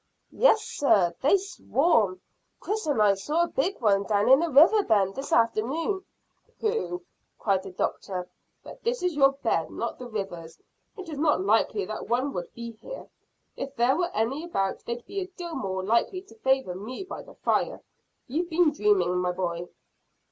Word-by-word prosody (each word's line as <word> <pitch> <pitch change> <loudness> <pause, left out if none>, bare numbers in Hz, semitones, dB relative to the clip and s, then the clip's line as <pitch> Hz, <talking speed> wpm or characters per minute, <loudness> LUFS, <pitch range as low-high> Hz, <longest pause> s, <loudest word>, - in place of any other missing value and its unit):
"Yes, 445 -3 +4
sir; 190 -11 +2
they 295 +9 +5
swarm. 275 - +1 0.4
Chris 430 -3 -3
and 285 -6 +1
I 205 -2 +5
saw 300 - 0
a - - 0
big 355 +8 -1
one 200 -3 +3
down 205 +2 +1
in 265 +1 +8
the 335 +1 0
river 325 +10 +6
bed 200 - +2
this 270 +4 -6
afternoon." 275 - +1 0.6
"Pooh!" 435 -5 -2 0.3
cried 195 -3 +1
the 190 - -8
doctor. 180 0 -3 0.4
"But - - -11
this 475 -3 -1
is 360 -3 0
your 275 -1 +5
bed, 275 - -1
not - - -4
the 250 - -7
river's. 185 -7 -6 0.4
It 380 -2 -8
is 305 -3 -6
not 295 - +3
likely 210 -1 +2
that 215 +3 -6
one 255 +4 0
would 175 - -5
be 235 0 -6
here. 365 - -10 0.5
If 275 0 -6
there 240 +3 +3
were 350 +1 0
any 260 +8 0
about, 195 - -2
they'd 235 0 -5
be 395 - -4
a 370 - -4
deal 355 -2 -8
more 190 -9 -3
likely 235 - +1
to 385 - -17
favour 265 -7 +1
me 220 - -6
by 375 - -7
the - - -15
fire. - - 0 0.5
You've 325 +7 -2
been 330 -1 +3
dreaming, 200 - +2
my 180 0 0
boy." 175 -1 -3
255 Hz, 180 wpm, -27 LUFS, -, 0.6 s, in